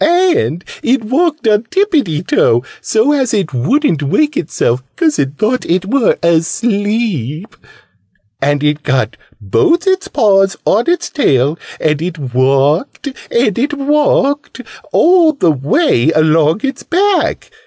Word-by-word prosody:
And 340 - +1 0.2
it 250 0 0
walked 295 +3 0
on 215 +1 +2
tippiety 280 - 0
toe, 120 +2 +2 0.2
so 225 +6 +1
as 265 -6 0
it 190 -9 -2
wouldn't 160 - 0
wake 295 - 0
itself, 130 - -1
'cause 315 -3 0
it 140 +1 -2
thought 240 +4 0
it 180 +2 -1
were 240 +2 +1
asleep. 195 - -1 0.9
And 145 +1 0
it 150 0 0
got 130 -6 -1 0.2
both 330 - +1
its 380 +1 0
paws 195 - +2
on 225 +10 +1
its 355 - 0
tail. 145 - +1 0.2
And 155 -1 0
it 175 0 -4
walked 135 - 0 0.2
and 235 -3 0
it 290 +4 -1
walked 285 0 0 0.3
all 340 -2 +4
the 180 - +1
way 145 - +1
along 155 +3 +2
its 275 0 -3
back. 385 +4 0
210 Hz, 130 wpm, -14 LUFS, -, 0.9 s, all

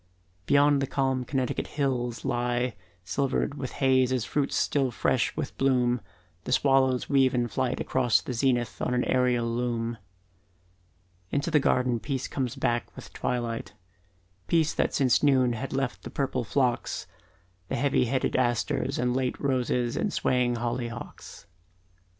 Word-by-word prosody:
Beyond 145 0 +4
the 135 - -1
calm 135 -2 0
Connecticut 130 -1 -2
the - - -13
hills 125 -4 -1
lie 120 0 0 0.3
Silvered 135 +9 -1
with 135 -3 -6
haze 130 -1 +4
as 125 -3 0
fruits 140 +2 -1
still 135 -3 +1
fresh 125 +2 0
with 155 -4 -4
bloom, 125 -3 +2 0.4
The - - -4
swallows 135 -2 +3
weave 135 -2 +3
in 120 -1 +1
flight 125 +2 -1
across 125 -3 +2
the 125 - -5
zenith 120 -1 0
On 125 - 0
an 125 - +1
aerial 125 -2 +2
loom. 115 -1 -2 1.3
Into 145 +4 -1
the 150 - +5
garden 125 -3 +1
peace 135 +1 -3
comes 130 -4 -3
back 120 -1 0
with - - -11
twilight, 120 -2 -3 0.7
Peace 160 -2 +2
that - - 0
since 130 -4 +3
noon 130 -4 +3
had 130 +4 -5
left 135 -2 -2
the - - -8
purple 130 -2 -1
phlox, 120 +3 0 0.6
The - - -2
heavy 135 0 +2
headed 130 +2 0
asters, 125 +2 0
the 125 - -1
late 125 +1 0
roses 125 -3 0
And - - -1
swaying 125 -1 +1
hollyhocks. 120 0 -5
125 Hz, 150 wpm, -27 LUFS, 120-135 Hz, 1.3 s, the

